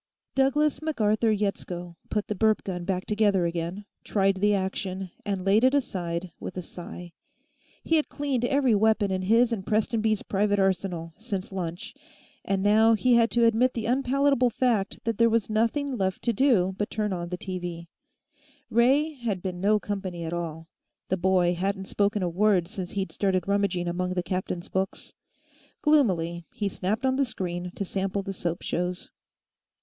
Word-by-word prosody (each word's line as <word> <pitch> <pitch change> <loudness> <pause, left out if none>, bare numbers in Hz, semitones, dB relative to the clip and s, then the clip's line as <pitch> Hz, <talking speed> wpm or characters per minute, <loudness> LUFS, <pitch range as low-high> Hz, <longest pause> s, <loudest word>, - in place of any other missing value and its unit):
Douglass 285 +3 +2
MacArthur 225 -7 +1
Yetsko 180 -4 -3
put 210 -1 -1
the - - -1
burp 215 +1 +2
gun 180 -2 -4
back 185 0 -1
together 205 -4 +2
again, 170 +4 -3 0.2
tried 195 -1 +1
the 205 +2 +3
action, 190 -1 -3 0.2
and 195 -2 -2
laid 205 +4 +4
it 260 +2 +5
aside 175 -9 -2
with 185 - -7
a 180 - -3
sigh. 175 0 -9 0.7
He 325 - +3
had 305 - 0
cleaned 280 -4 -2
every 265 -1 +3
weapon 215 -1 +3
in 185 0 -1
his 230 +5 +3
and 200 -4 -3
Prestonby's 220 0 +1
private 205 +1 +1
arsenal, 185 -4 0
since 200 -5 -4
lunch, 185 +4 -5 0.5
and 195 -1 -1
now 220 +2 +5
he 250 +3 +3
had 230 -1 +5
to 235 -1 +3
admit 230 +3 +3
the 230 -2 -2
unpalatable 265 +1 +2
fact 230 -5 0
that 230 -2 -2
there 230 0 +5
was 225 -1 0
nothing 250 +6 +1
left 190 -4 -2
to 235 - +1
do 205 -7 +3
but 205 - -1
turn 210 -2 -1
on 175 -1 -4
the 180 - -3
TV. 175 -3 -5 0.9
Ray 270 +7 +3
had 230 -9 -3
been 180 -2 -4
no 210 +2 +3
company 190 -5 -4
at 165 - -4
all; 165 -2 -4 0.4
the 190 - +1
boy 180 -1 +3
hadn't 190 +2 -2
spoken 205 +1 0
a - - +1
word 185 0 +2
since 185 -2 -5
he'd 195 -1 -2
started 190 -3 0
rummaging 200 -3 +1
among 180 +1 -2
the 180 - 0
captain's 180 -1 -3
books. 190 0 -3 0.7
Gloomily, 175 - +2
he 205 -2 -1
snapped 205 +7 -2
on 260 0 +2
the 280 - +3
screen 180 -7 -4
to 200 - -3
sample 195 +1 -2
the 195 0 -4
soap 175 -2 -3
shows. 180 +1 -2
200 Hz, 175 wpm, -26 LUFS, 180-230 Hz, 0.9 s, it